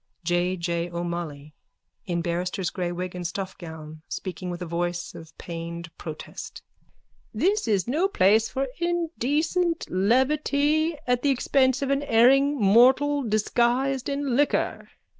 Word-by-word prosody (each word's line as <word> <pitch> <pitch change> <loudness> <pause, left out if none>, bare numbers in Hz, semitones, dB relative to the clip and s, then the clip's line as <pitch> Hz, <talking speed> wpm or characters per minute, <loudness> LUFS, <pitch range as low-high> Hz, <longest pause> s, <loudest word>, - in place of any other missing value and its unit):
_ - - -50
J. 175 +2 0
J. 170 0 -2
O'MOLLOY: 170 -4 -5 0.5
(In 170 -2 -1
barrister's 180 +2 -2
grey 180 -2 -3
wig 180 +1 -4
and 180 -1 -3
stuffgown, 160 -5 -7
speaking 185 -1 -5
with 175 -1 -5
a - - -4
voice 175 +1 -3
of 160 -1 -12
pained 170 -1 -7
protest.) 155 -2 -8 0.7
This 410 +4 +1
is 205 -3 +1
no 315 +10 +2
place 220 - +3
for 270 +1 -2
indecent 335 0 0
levity 290 - +2
at 245 -1 +1
the 285 - +2
expense 265 0 +2
of 275 - -1
an 275 0 +1
erring 275 +3 +4
mortal 260 +8 +5
disguised 245 +4 +1
in 280 -3 -1
liquor. 290 +2 0
220 Hz, 135 wpm, -25 LUFS, 175-280 Hz, 0.7 s, mortal